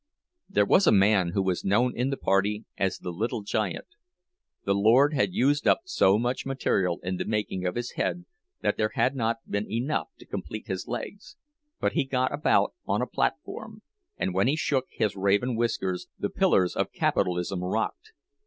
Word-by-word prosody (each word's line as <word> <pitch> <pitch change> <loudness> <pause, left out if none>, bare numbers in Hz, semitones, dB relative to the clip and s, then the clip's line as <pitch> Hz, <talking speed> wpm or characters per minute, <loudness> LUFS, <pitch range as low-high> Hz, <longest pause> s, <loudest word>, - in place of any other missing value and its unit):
There 105 - +3
was 190 - +4
a - - +7
man 95 -3 +4
who 100 - +2
was 95 -2 -1
known 120 +6 +2
in 125 +3 0
the 135 - -2
party 100 +3 +1
as 95 -1 0
the 90 - -6
"Little 110 +4 -3
Giant." 105 0 -2 0.8
The 100 - +2
Lord 120 +9 +4
had 115 -9 +1
used 145 +3 +2
up - - +4
so 100 - +3
much 120 +3 -1
material 95 -10 0
in 90 +1 -2
the - - -3
making 105 -4 -2
of 90 - -2
his 120 0 -3
head 175 - -2 0.4
that - - 0
there 110 0 0
had 130 - +2
not 115 -2 -2
been 100 +1 -3
enough 120 +7 -1
to - - -15
complete 110 - -6
his 95 -1 -4
legs; 190 -5 -6 0.4
but - - +1
he - - +2
got 130 -1 0
about 150 - +2
on - - +1
the - - +1
platform, - - -3 0.3
and 190 - -1
when - - +2
he 140 - +2
shook 135 -4 0
his 105 -3 -1
raven 100 +6 +1
whiskers 100 -6 -1
the - - -3
pillars 90 -1 +2
of - - -1
capitalism 90 0 0
rocked. 110 - -2
110 Hz, 185 wpm, -27 LUFS, 95-130 Hz, 0.8 s, a